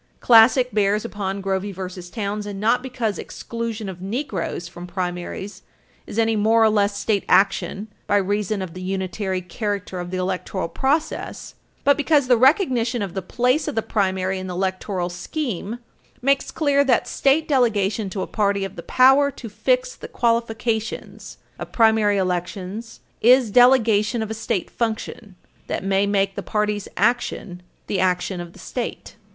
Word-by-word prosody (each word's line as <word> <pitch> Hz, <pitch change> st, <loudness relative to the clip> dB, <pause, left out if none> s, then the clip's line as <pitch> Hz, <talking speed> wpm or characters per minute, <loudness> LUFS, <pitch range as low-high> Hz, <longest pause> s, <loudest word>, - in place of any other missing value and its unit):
Classic 245 Hz, +2 st, +6 dB
bears 210 Hz, +1 st, +1 dB
upon 200 Hz, -3 st, -4 dB
Grovey 195 Hz, +1 st, -1 dB
v. 185 Hz, -1 st, -6 dB
Townsend 205 Hz, -2 st, -4 dB
not 230 Hz, +4 st, +2 dB
because 245 Hz, -5 st, -3 dB
exclusion 230 Hz, -2 st, -5 dB
of 180 Hz, -2 st, -7 dB
Negroes 200 Hz, -, -3 dB
from 175 Hz, +1 st, -9 dB
primaries 180 Hz, +2 st, -5 dB, 0.5 s
is -, -, -7 dB
any 225 Hz, 0 st, +2 dB
more 220 Hz, +2 st, +4 dB
or 220 Hz, -, +5 dB
less 205 Hz, -1 st, +1 dB
state 205 Hz, -2 st, 0 dB
action 195 Hz, +1 st, +2 dB, 0.2 s
by 205 Hz, -, +3 dB
reason 205 Hz, 0 st, -1 dB
of 175 Hz, -3 st, -7 dB
the 185 Hz, -, -8 dB
unitary 190 Hz, 0 st, -2 dB
character 200 Hz, -1 st, -4 dB
of 175 Hz, 0 st, -5 dB
the 185 Hz, -, -3 dB
electoral 185 Hz, 0 st, -2 dB
process, 280 Hz, -, -2 dB, 0.3 s
but 285 Hz, 0 st, +4 dB
because 295 Hz, -1 st, +3 dB
the 250 Hz, -1 st, +5 dB
recognition 250 Hz, -, +3 dB
of 190 Hz, -3 st, -5 dB
the 190 Hz, -, -3 dB
place 250 Hz, -, 0 dB
of 300 Hz, -, -3 dB
the 225 Hz, -, 0 dB
primary 190 Hz, -2 st, 0 dB
in 185 Hz, -, -6 dB
the 180 Hz, -, -5 dB
electoral 185 Hz, 0 st, -2 dB
scheme 205 Hz, -, -4 dB, 0.4 s
makes 275 Hz, +2 st, +1 dB
clear 285 Hz, -2 st, +2 dB
that 255 Hz, -4 st, +2 dB
state 290 Hz, +3 st, +2 dB
delegation 220 Hz, -6 st, +1 dB
to 190 Hz, 0 st, -3 dB
a -, -, -3 dB
party 200 Hz, -2 st, 0 dB
of 195 Hz, -, -8 dB
the -, -, -5 dB
power 270 Hz, +7 st, +5 dB
to 245 Hz, -4 st, -9 dB
fix 255 Hz, +4 st, 0 dB
the -, -, -9 dB
qualifications 230 Hz, -1 st, -2 dB, 0.2 s
of -, -, -7 dB
primary 220 Hz, -3 st, +3 dB
elections 185 Hz, +4 st, -3 dB, 0.2 s
is 245 Hz, -1 st, +5 dB
delegation 235 Hz, -2 st, +4 dB
of 220 Hz, -, -6 dB
a -, -, -1 dB
state 215 Hz, -4 st, -3 dB
function 220 Hz, -3 st, -4 dB, 0.3 s
that -, -, -3 dB
may 195 Hz, +1 st, +2 dB
make 195 Hz, -1 st, +1 dB
the -, -, -5 dB
party's 210 Hz, -1 st, -1 dB
action 200 Hz, -4 st, 0 dB, 0.2 s
the 195 Hz, -, -2 dB
action 180 Hz, 0 st, 0 dB
of 175 Hz, 0 st, -9 dB
the -, -, -16 dB
state. 245 Hz, -2 st, -6 dB
210 Hz, 160 wpm, -22 LUFS, 190-235 Hz, 0.5 s, Classic